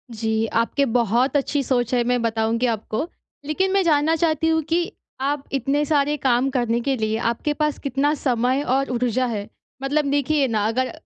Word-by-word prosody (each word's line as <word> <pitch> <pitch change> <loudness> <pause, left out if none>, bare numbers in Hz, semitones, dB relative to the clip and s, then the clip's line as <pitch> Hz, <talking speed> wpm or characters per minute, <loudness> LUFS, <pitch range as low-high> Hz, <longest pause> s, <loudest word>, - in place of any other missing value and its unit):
जी, 220 0 0
आपके 230 +6 +1
बहुत 240 +4 +2
अच्छी 285 +1 0
सोच 245 -1 0
है, 240 -1 +3
मैं 245 0 +1
बताऊँगी 225 +1 0
आपको। 220 +3 -3 0.4
लेकिन 375 +6 0
मैं 390 0 +3
जानना 315 -1 +3
चाहती 320 -1 +1
हूँ 320 0 +2
कि 345 +4 0 0.3
आप 280 +1 -1
इतने 275 +3 +1
सारे 295 0 +2
काम 260 0 +2
करने 240 -2 0
के 270 +2 0
लिए 220 0 -1
आपके 295 +5 -2
पास 300 -1 -1
कितना 280 +2 0
समय 255 -1 0
और 270 +2 +1
ऊर्जा 250 +1 0
है? 210 -4 -3 0.4
मतलब 290 +2 +1
देखिए 285 0 +2
ना, 215 -3 0
अगर 255 +3 -1
265 Hz, 180 wpm, -22 LUFS, 235-295 Hz, 0.4 s, है